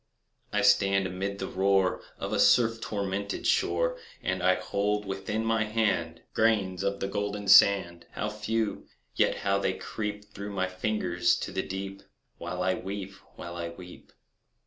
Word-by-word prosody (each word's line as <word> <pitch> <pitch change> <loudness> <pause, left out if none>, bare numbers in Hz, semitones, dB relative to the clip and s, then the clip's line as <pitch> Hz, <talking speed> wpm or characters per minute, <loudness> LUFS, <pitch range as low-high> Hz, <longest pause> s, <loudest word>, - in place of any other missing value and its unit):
I 105 -1 +1
stand 100 -1 +4
amid 95 +2 -3
the 95 - -3
roar 95 -1 +2 0.2
Of - - -4
a - - +1
surf 115 -2 +4
tormented 100 -1 -3
shore, 85 -1 +1 0.2
And - - -1
I 90 +1 +4
hold 100 +3 -1
within 95 +3 -3
my 115 -1 +2
hand 95 -7 0
Grains 100 -5 +2
of 100 0 -1
the 95 - 0
golden 105 0 -3
sand— 95 -3 +5
How - - -2
few! 105 +1 -2 0.3
yet - - +3
how 100 0 +2
they 95 - 0
creep 105 0 -5
Through 100 0 -6
my 95 -1 0
fingers 95 -2 0
to - - -4
the - - -1
deep, 95 +1 -6 0.4
While 90 0 -3
I 95 0 +2
weep—while 95 -3 -7
I 85 -1 -4
weep! 90 +1 -12
100 Hz, 155 wpm, -28 LUFS, 95-105 Hz, 0.4 s, sand